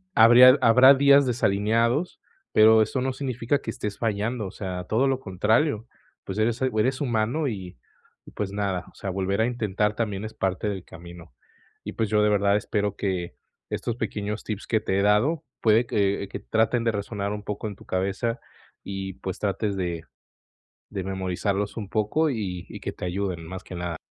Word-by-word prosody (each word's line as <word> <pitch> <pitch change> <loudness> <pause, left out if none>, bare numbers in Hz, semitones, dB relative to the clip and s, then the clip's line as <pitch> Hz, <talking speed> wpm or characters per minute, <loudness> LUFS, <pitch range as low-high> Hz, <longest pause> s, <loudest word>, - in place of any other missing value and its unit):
habría 125 +4 +8
habrá 125 +4 +7
días 140 0 +5
desalineados, 115 - +1 0.3
pero 110 +1 +7
eso 130 +4 -3
no 130 0 -1
significa 130 0 -1
que 115 - -4
estés 105 -2 -5
fallando, 110 +1 -1
o - - -8
sea, 90 -3 -5
todo 115 +8 +1
lo 135 -1 0
contrario, 110 - 0 0.4
pues, 95 - -6
eres 115 +2 0
el 130 - +2
o 110 - 0
eres 130 +5 +1
humano 125 +4 0
y 95 - -6 0.5
y, - - -13
pues, 100 -2 -4
nada, 100 -3 -2
o - - -29
sea, 95 - -5
volver 95 +2 -1
a - - +3
intentar 105 -3 -1
también 105 -3 -2
es 110 - -7
parte 95 +2 -2
del 95 -3 -4
camino. 85 -3 -12 0.5
Y, - - -5
pues, 110 -2 -1
yo, 105 0 +3
de 105 - +4
verdad, 100 0 +3
espero 105 -1 -2
que 90 -7 -3 0.3
estos 120 - -3
pequeños 105 -2 -4
tips 105 -2 -5
que 110 - +2
te 95 -2 0
he - - +2
dado, 110 +11 +2 0.2
puede 115 +2 +4
que 100 -2 0
que - - -5
traten 115 +2 +1
de 115 - +2
resonar 100 0 -3
un 105 0 -6
poco 105 +1 -4
en 105 - -6
tu - - -16
cabeza 100 +6 -1 0.4
y, 95 -1 -5
pues, 95 -2 -6
trates 100 0 -1
de 85 -3 -3 0.9
de 100 -3 -4
memorizarlos 95 +2 -2
un 105 -3 -4
poco 110 +10 +1
y 95 -7 -4
y - - -8
que - - -4
te - - -6
ayuden 90 -2 -3
más 95 +2 -7
que 90 - -9
nada. 85 -1 -4
105 Hz, 190 wpm, -25 LUFS, 95-115 Hz, 0.9 s, habría